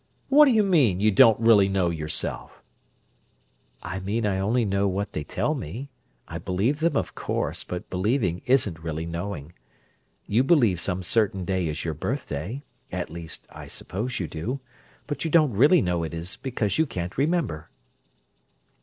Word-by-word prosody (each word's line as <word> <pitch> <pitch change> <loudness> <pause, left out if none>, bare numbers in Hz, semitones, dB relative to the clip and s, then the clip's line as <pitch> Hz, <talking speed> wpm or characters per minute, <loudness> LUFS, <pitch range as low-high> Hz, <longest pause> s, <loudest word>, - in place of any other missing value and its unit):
"What 295 +2 +8
do 275 - +4
you 220 -3 +4
mean: 145 - +3
you 105 +2 +4
don't 110 +1 +6
really 110 -4 +5
know 95 -3 +1
yourself?" 80 -2 -3 1.2
"I 90 +3 -4
mean 105 +4 -2
I 95 -2 0
only 115 +5 +1
know 100 0 +1
what 100 +2 -2
they 75 - -3
tell - - -1
me. 120 - -6 0.4
I - - -6
believe 105 +11 0
them, 165 +2 +1
of - - -2
course, - - -3
but 90 -1 -6
believing 95 -2 0
isn't 110 -11 +2
really 80 0 -4
knowing. 85 -2 -5 0.7
You 115 +5 +2
believe 120 - +3
some 90 0 -2
certain 100 -1 +1
day 95 -2 0
is 75 +1 -4
your 80 - -1
birthday—at 120 - -5
least, 85 -1 -8
I - - -10
suppose 115 +7 -4
you 90 - -2
do—but 125 - -7
you 165 - -1
don't 155 -5 +4
really 145 - +5
know 90 -2 0
it 80 0 -4
is 85 +4 -4
because 120 -2 -2
you 160 - +3
can't 90 -5 -5
remember." 135 - -1
100 Hz, 165 wpm, -25 LUFS, 85-130 Hz, 1.2 s, What